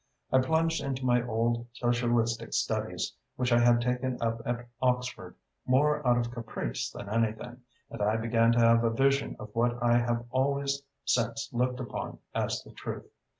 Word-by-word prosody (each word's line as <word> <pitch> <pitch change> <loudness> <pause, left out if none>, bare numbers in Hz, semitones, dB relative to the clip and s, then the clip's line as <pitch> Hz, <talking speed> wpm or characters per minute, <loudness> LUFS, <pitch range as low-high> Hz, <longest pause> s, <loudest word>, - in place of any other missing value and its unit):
I 130 - +5
plunged 160 +5 +1
into 135 -1 -3
my 120 -1 +4
old 115 +1 0
socialistic 120 -1 0
studies, - - -1 0.2
which 125 -1 -1
I 120 - +5
had 120 0 +5
taken 125 +1 -1
up 115 0 -1
at 120 0 -2
Oxford 125 -1 -1 0.3
more 150 +3 +3
out 120 0 +5
of 120 -1 -1
caprice 115 - -4
than 100 - -9
anything, 115 +2 -1 0.3
and - - -6
I 105 +2 +2
began 115 0 +3
to 120 - +2
have 115 0 +5
a 115 - +3
vision 135 +4 +1
of 105 0 -9
what 120 +1 +1
I 120 0 +4
have 120 0 -1
always 140 +1 0 0.2
since 115 -1 0
looked 125 +1 0
upon 125 - -5 0.2
as - - -1
the - - -14
truth. - - -7
120 Hz, 170 wpm, -29 LUFS, 115-130 Hz, 0.3 s, I